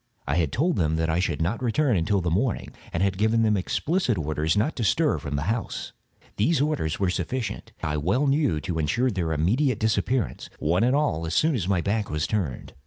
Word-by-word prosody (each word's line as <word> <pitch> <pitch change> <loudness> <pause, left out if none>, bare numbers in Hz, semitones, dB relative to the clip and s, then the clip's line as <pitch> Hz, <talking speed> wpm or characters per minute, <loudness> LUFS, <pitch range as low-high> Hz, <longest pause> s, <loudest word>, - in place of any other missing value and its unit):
I 70 +3 0
had 80 -5 +1
told 165 +6 +1
them 80 -2 +1
that 80 0 0
I 80 - +1
should 90 -2 0
not 105 +9 -1
return 125 +1 +2
until 95 +3 +1
the 85 -1 -1
morning, 105 +6 0 0.2
and 85 - 0
had 95 -1 0
given 110 +2 +3
them 105 -1 +3
explicit 125 - 0
orders 80 +2 0
not 115 +10 +1
to 120 - -1
stir 110 - +2
from 75 -1 -4
the 70 - -1
house. 115 +6 -3 0.4
These 150 +10 +2
orders 140 - 0
were 95 -2 +1
sufficient, 105 +5 -3
I 75 0 -1
well 95 - +1
knew, 140 - +2
to 85 -2 -3
insure 120 - +1
their 90 -5 -2
immediate 110 - +1
disappearance, 110 +2 -1
one 85 +6 +1
and 125 +3 +3
all, 140 - 0
as 80 - -2
soon 160 +1 +3
as 100 -9 -1
my 95 -3 +2
back 105 +3 -1
was 75 0 -1
turned. 90 - -3
100 Hz, 215 wpm, -25 LUFS, 80-125 Hz, 0.4 s, given